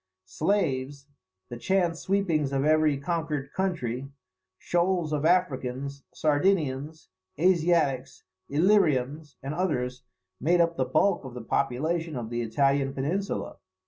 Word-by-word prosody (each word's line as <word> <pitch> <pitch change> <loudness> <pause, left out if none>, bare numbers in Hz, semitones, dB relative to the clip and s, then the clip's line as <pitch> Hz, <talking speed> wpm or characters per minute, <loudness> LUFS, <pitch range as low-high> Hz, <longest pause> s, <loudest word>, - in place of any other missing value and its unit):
Slaves, 140 - -1 0.4
the 120 - -6
chance 175 +3 +1
sweepings 170 -8 0
of 135 0 0
every 155 -2 +3
conquered 150 -2 -3
country, 135 -9 -2 0.5
shoals 175 - 0
of 150 0 -1
Africans, 140 -5 0
Sardinians, 155 - 0 0.3
Asiatics, 165 -7 +2 0.3
Illyrians, 150 -4 +2
and 140 +2 -3
others, 130 -8 -1 0.4
made 175 +5 +2
up 170 0 +3
the 130 - 0
bulk 175 +8 +2
of 130 -2 -9
the 120 - -6
population 155 +7 -1
of 120 -2 -5
the 120 0 -1
Italian 135 +4 +1
peninsula. 175 +9 -2
150 Hz, 115 wpm, -27 LUFS, 135-170 Hz, 0.5 s, every